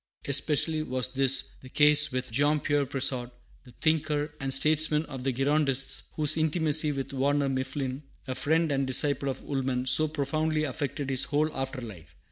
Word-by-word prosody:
Especially 150 +3 +1
was 130 -4 -2
this 135 0 +2 0.2
the 130 - -12
case 150 +1 +5
with 130 -1 -3
Jean 145 +5 +2
Pierre 145 -1 0
Brissot, 130 -2 -2 0.4
the 125 - -16
thinker 155 -2 0
and 135 -1 -3
statesman 155 +2 +3
of 135 -4 -8
the 135 - 0
Girondists, 135 0 0
whose 155 0 +2
intimacy 155 -1 +2
with 140 -1 -5
Warner 140 +1 +1
Mifflin, 130 0 -3 0.3
a 130 - -2
friend 160 +4 +1
and 135 -1 0
disciple 140 +1 0
of 135 - -5
Woolman, 130 -2 -2
so 130 +5 +2
profoundly 155 +1 -1
affected 140 -1 -3
his 130 - +1
whole 155 +2 0
after 135 0 -4
life. 85 -9 -11
140 Hz, 165 wpm, -28 LUFS, 130-150 Hz, 0.4 s, case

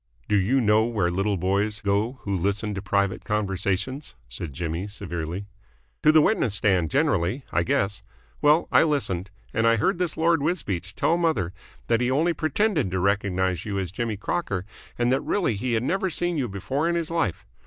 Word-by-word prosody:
"Do 105 - +2
you 105 +8 +3
know 110 0 +4
where 105 -7 0
little 95 +3 0
boys 100 +4 0
go 100 +3 0
who 100 -1 -1
listen 100 +3 -1
to 100 - -4
private 100 -1 0
conversations?" 100 - -2
said 65 +6 -6
Jimmy 85 +6 -3
severely. 90 -2 -5 0.6
"To 155 - +6
the 155 -1 +6
witness 120 - +2
stand 95 -5 +2
generally, 130 - +1
I 90 - +2
guess. 100 +4 0 0.4
Well, 150 +3 +4
I - - +6
listened, 100 - 0 0.2
and 115 0 +2
I 115 - +5
heard 170 - +1
this 175 -4 -1
Lord 165 -1 +3
Wisbeach 100 - -2
tell 170 - +2
mother 115 - 0 0.3
that 115 0 +2
he 125 - +2
had 130 - +1
only 165 +5 +2
pretended 155 - +1
to 95 +1 -1
recognise 95 -2 0
you 100 -2 -3
as 95 -3 -2
Jimmy 110 +1 -2
Crocker 100 - -2 0.3
and 120 0 +2
that 135 - +2
really 180 - 0
he 120 +4 -2
had 115 0 +1
never 190 +7 0
seen 175 +1 -1
you 135 -5 0
before 135 - -1
in 170 - +1
his 165 -1 -2
life. 105 - -1
105 Hz, 190 wpm, -25 LUFS, 95-145 Hz, 0.6 s, To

